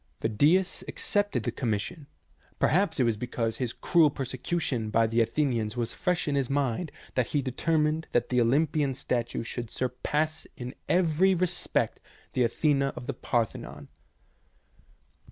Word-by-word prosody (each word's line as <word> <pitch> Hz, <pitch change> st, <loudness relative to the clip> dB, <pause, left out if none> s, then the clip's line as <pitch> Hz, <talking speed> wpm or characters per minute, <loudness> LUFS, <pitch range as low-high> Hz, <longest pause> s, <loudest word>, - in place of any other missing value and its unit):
Phidias 150 Hz, -, +2 dB
accepted 205 Hz, -, -1 dB
the 120 Hz, -, -1 dB
commis 115 Hz, -4 st, -1 dB
sion. 155 Hz, +4 st, -8 dB, 0.5 s
Perhaps 175 Hz, -2 st, +2 dB
it -, -, +5 dB
was 115 Hz, -3 st, +1 dB
because 115 Hz, -1 st, -2 dB
his 125 Hz, -3 st, -1 dB
cruel 165 Hz, +2 st, +4 dB
persecu 135 Hz, +5 st, -3 dB
tion 120 Hz, -8 st, -1 dB
by 115 Hz, +1 st, +3 dB
the 115 Hz, +1 st, +2 dB
Athenians 115 Hz, -2 st, 0 dB
was 120 Hz, -1 st, -2 dB
fresh 180 Hz, -3 st, 0 dB
in 145 Hz, -, +1 dB
his 135 Hz, -3 st, 0 dB
mind 140 Hz, +3 st, 0 dB, 0.2 s
that 125 Hz, -2 st, +1 dB
he 145 Hz, -, 0 dB
determined 155 Hz, +4 st, 0 dB
that 120 Hz, -, +1 dB
the 125 Hz, -1 st, +3 dB
Olympian 140 Hz, +2 st, +2 dB
statue 120 Hz, -3 st, -2 dB
should 120 Hz, 0 st, -5 dB
surpass 150 Hz, +6 st, -2 dB
in 125 Hz, +1 st, -6 dB, 0.2 s
every 180 Hz, +2 st, +4 dB
respect 180 Hz, 0 st, 0 dB, 0.3 s
the 130 Hz, -, +1 dB
Athena 140 Hz, +3 st, +2 dB
of -, -, -7 dB
the 140 Hz, -, -2 dB
Par 120 Hz, -2 st, +1 dB
thenon. -, -, -10 dB
135 Hz, 155 wpm, -28 LUFS, 120-155 Hz, 0.5 s, it